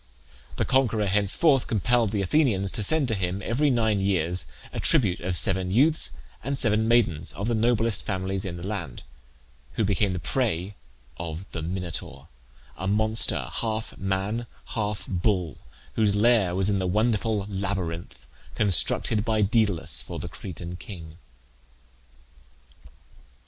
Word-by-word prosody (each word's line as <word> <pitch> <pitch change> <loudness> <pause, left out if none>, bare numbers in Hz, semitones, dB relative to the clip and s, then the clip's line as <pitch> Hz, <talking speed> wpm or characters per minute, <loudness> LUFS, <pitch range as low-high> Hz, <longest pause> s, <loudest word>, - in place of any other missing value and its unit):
The - - 0
conqueror 115 -5 +2
henceforth 105 - +3
compelled 115 +1 +2
the 100 -1 -1
Athenians 100 - +2
to - - -2
send 145 +6 +3
to - - +1
him 95 -1 -2
every 140 +6 +2
nine 110 -5 +2
years 90 -4 0 0.3
a - - -4
tribute 110 - +4
of 90 0 -1
seven 95 -3 +1
youths 120 - +3 0.3
and 135 +3 -2
seven 110 -3 +2
maidens 95 -9 +2
of 100 - -4
the 120 - +1
noblest 115 -1 +2
families 95 0 -2
of 85 -2 -5
the 85 - -7
land, 100 - -5 0.7
who 110 - 0
became 100 0 +1
the - - -3
prey 90 - -1 0.4
of 85 +2 -6
the 85 - -4
Minotaur, 85 -1 -5 0.5
a 95 - -4
monster, 110 +2 +3
half 110 -1 -3
man, 100 +5 -2 0.3
half 105 -3 -2
bull, 90 -4 -1 0.3
whose 105 -2 +2
lair 105 -4 +3
was 95 0 +1
in 100 -1 +1
the 95 - -1
wonderful 110 +1 +1
labyrinth, 95 -4 -4 0.3
constructed 105 +1 +2
by 110 -2 +1
Daedalus 95 - +1
for 70 - -7
the - - -5
Cretan 90 0 -7
king. 80 -5 -10
100 Hz, 140 wpm, -26 LUFS, 90-110 Hz, 0.7 s, tribute